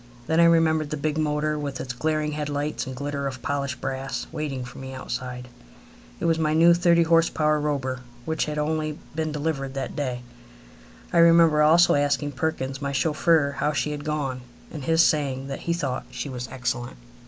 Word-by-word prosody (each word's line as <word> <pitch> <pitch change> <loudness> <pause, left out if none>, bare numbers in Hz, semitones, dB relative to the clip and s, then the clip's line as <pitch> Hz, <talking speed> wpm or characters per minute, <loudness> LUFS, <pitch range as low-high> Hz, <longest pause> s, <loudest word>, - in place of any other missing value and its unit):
Then 160 +4 +1
I 170 - +7
remember 165 -2 +4
the 150 0 -5
big 155 +2 -1
motor, 150 0 0
with 140 -2 -4
its 130 -1 -4
glaring 155 +3 -1
head 150 -1 -3
lights 145 0 -2
and 130 - -5
glitter 140 +1 -3
of 130 -2 -7
polished 140 -2 -2
brass, 135 +1 -4
waiting 135 -4 -4
for 125 - -10
me 130 0 -7
outside. 125 0 -5 0.7
It - - -3
was 165 -1 +2
my 155 -1 +1
new 170 +2 +7
thirty 170 -1 +4
horse 165 0 +4
power 155 -1 +1
Robur, 135 -3 -1 0.3
which 160 0 0
had 150 0 -4
only 155 0 -1 0.2
been 155 0 -2
delivered 145 -3 -3
that 135 - -4
day. 125 -4 -3 0.9
I 170 - +4
remember 165 -2 +6
also 165 +3 +6
asking 145 0 +1
Perkins, 135 -1 -3
my 140 0 -2
chauffeur, 150 +1 +2
how 150 - +1
she 150 +2 -1
had 145 -1 -5
gone, 145 -4 -2 0.3
and 145 -4 -7
his 165 0 +4
saying 135 -3 +1
that 135 - -4
he - - +4
thought 135 -7 -3
she 145 - -5
was 125 -2 -5
excellent. 120 - -4
150 Hz, 190 wpm, -25 LUFS, 135-155 Hz, 0.9 s, I